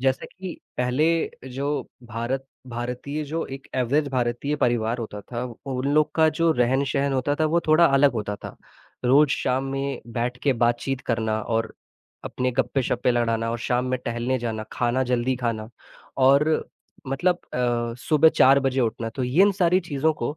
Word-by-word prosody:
जैसे 130 0 0
कि 185 -2 -8 0.2
पहले 125 +5 +2 0.5
जो 140 +2 -2 0.4
भारत 120 +4 -3 0.2
भारतीय 125 +5 -4
जो 160 +3 -3
एक 135 0 -9
एवरेज़ 140 +4 +1
भारतीय 125 +3 -1
परिवार 120 -3 +1
होता 110 -3 -6
था, 120 +4 -6 0.2
उन 130 0 -2
लोग 155 0 +3
का 160 -1 +5
जो 165 -1 +4 0.3
रहन-सहन 140 0 0
होता 135 +2 0
था, 155 - +4
वो 170 +2 +2
थोड़ा 155 +2 +6
अलग 140 -1 +4
होता 105 -3 -3
था, - - -10 0.5
रोज़ 140 +4 +5
शाम 130 +1 0
में 135 0 -3
बैठ 120 +1 -2
के 140 - +3
बातचीत 120 +2 0
करना 110 -2 0
और 115 -1 -1 0.5
अपने 125 0 -1
गप्पे-शप्पे 125 -1 0
लड़ाना 115 -1 0
और 120 - -2
शाम 125 +2 0
में 130 - 0
टहलने 120 +2 -1
जाना, 115 -2 -3
खाना 120 +2 +1
जल्दी 125 +1 0
खाना 115 -3 -3 0.6
और 140 +3 +5 0.6
मतलब 175 +7 +1 0.2
अ, 120 -1 0
सुबह 155 +4 +4
4 135 -2 +5
बजे 135 -1 0
उठना, 115 -1 -1
तो 125 +3 -3
यिन 175 +12 +4
सारी 180 -1 +3
चीज़ों 160 -2 0
को 150 0 -4
130 Hz, 165 wpm, -24 LUFS, 120-140 Hz, 0.6 s, थोड़ा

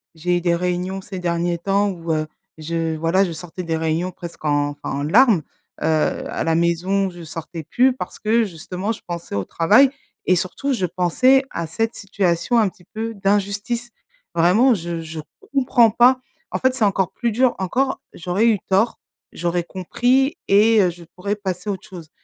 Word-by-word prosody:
J'ai 175 +2 0
eu - - -2
des 170 -1 +2
réunions 180 +2 -2
ces 190 -1 -7
derniers 170 0 -1
temps 200 +3 +1
où, 170 -3 -3
heu, 155 0 -1 0.3
je 165 +1 -2
voilà 165 +5 +2
je 175 - -4
sortais 175 +2 -7
des 165 -1 -1
réunions 160 +3 -1
presque 170 -2 -10
en 145 -1 +2
enfin 145 0 -7
en - - -2
larmes, 210 - +5 0.4
heu, - - -1 0.4
à - - -2
la 165 0 +1
maison, 180 +4 +1
je 175 -1 -11
sortais 165 +1 -7
plus 250 - +3
parce - - -7
que 225 +2 +2
justement 185 +2 -4
je - - -11
pensais 170 - -5
au 100 - 0
travail 215 - +4 0.3
et 185 - +4
surtout 190 +10 -2
je 190 -7 0
pensais 185 +10 +3
à 170 -1 -3
cette 225 +8 -1
situation 190 +2 0
un 215 -4 +4
petit 180 -1 -22
peu 225 +4 -5
d'injustice. 205 +4 -1 0.4
Vraiment 185 +10 +4
je 170 -4 -3
je 160 0 -7 0.3
comprends 245 -4 +4
pas, 245 +3 +5 0.3
en - - -1
fait, 260 0 +2
c'est 250 -4 +1
encore 195 -2 +1
plus 235 -2 -1
dur. 250 +2 +2
Encore, 260 +9 0
j'aurais 180 +6 0
eu 215 -4 +3
tort, 195 +5 +2 0.3
j'aurais 175 +1 -1
compris 245 - +1
et 215 +2 +5
heu, 180 - +3
je 175 0 -10
pourrais 200 +3 -2
passer 190 -1 -4
à - - +1
autre 190 +2 -10
chose. 170 -6 -10
185 Hz, 190 wpm, -21 LUFS, 170-220 Hz, 0.4 s, larmes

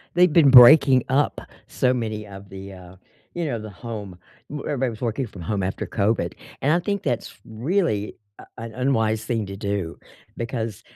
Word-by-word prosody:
They've 180 -2 +5
been 155 -5 +6
breaking 130 0 +8
up 140 +3 +1 0.3
so 130 0 +1
many 110 -3 -4
of 100 0 -11
the, 95 0 -9
uh, 90 0 -13 0.4
you 175 -1 -2
know, 120 -7 -2
the 110 -1 -8
home 105 -4 -8 0.3
w 145 -1 -6
everybody 135 -3 -1
was 110 - -10
working 125 +2 -2
from 95 -5 -11
home 100 +3 -2
after 95 +1 -3
COVID, 110 +1 0 0.3
and 145 +3 +3
I 175 - +3
think 200 +2 -2
that's 120 - -2
really 115 - -1 0.2
a - - -13
an 115 0 -7
unwise 110 -4 0
thing 110 -3 -2
to 100 0 -7
do 100 -4 -3 0.4
because 115 -4 -4
115 Hz, 180 wpm, -23 LUFS, 100-135 Hz, 0.4 s, breaking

